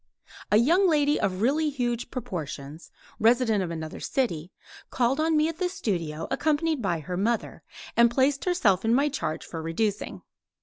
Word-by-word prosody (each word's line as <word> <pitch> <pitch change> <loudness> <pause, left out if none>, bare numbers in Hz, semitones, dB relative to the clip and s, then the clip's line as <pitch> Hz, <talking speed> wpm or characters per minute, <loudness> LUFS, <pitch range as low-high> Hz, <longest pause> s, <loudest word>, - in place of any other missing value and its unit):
A 210 - +6
young 345 - +4
lady 295 -2 +2
of 190 +1 -1
really 300 +5 +2
huge 245 -4 -2
proportions, 160 - -6 0.3
resident 225 -2 +3
of 175 - -4
another 160 -2 -6
city, 180 - -2 0.4
called 255 +3 +1
on 315 0 +2
me 305 +1 +3
at 330 +1 -5
the 365 -1 0
studio 165 - -3
accompanied 310 -1 +1
by 175 -6 -1
her 180 +4 -5
mother, 225 +4 -1 0.3
and 235 0 +6
placed 270 +3 +1
herself 215 - +2
in 225 +1 +3
my 285 +3 +3
charge 160 - -3
for 165 - -6
reducing. 200 +6 -2
235 Hz, 165 wpm, -26 LUFS, 180-290 Hz, 0.4 s, A